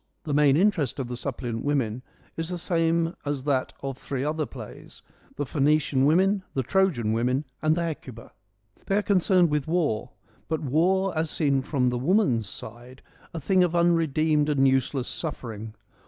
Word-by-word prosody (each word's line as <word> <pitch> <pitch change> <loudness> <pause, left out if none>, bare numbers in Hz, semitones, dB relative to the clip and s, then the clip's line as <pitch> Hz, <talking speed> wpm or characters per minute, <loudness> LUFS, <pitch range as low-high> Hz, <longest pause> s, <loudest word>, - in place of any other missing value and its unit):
The 150 - -3
main 145 -1 +4
interest 165 - +1
of 130 -3 -4
the 125 - -4
Suppliant 120 -2 -4
Women 130 -5 -1 0.3
is 165 +1 -3
the 180 - -3
same 165 -1 +1
as 145 -2 -3
that 135 -2 0
of 135 -1 -4
three 135 -2 -4
other 155 +1 -1
plays: 115 -5 -11 0.3
the 145 - -2
Phoenician 145 -1 +2
Women, 190 +5 +3
the 130 - 0
Trojan 130 - +1
Women, 125 +5 0 0.2
and 155 0 +3
the 170 - -1
Hecuba. 130 -8 -7 0.6
They 195 - +2
are 210 - +1
concerned 185 -4 +3
with 150 -1 -1
war; 160 -10 0 0.4
but 160 -1 -1
war, 180 +7 +1
as 160 0 0
seen 140 -4 +1
from 130 -2 0
the 125 0 -2
woman's 130 - +2
side, 120 +3 -11 0.3
a 165 - -5
thing 185 +5 +3
of 175 -1 0
unredeemed 160 -3 +2
and 135 -2 +3
useless 130 0 0
suffering. 115 -8 -5
145 Hz, 170 wpm, -26 LUFS, 130-165 Hz, 0.6 s, main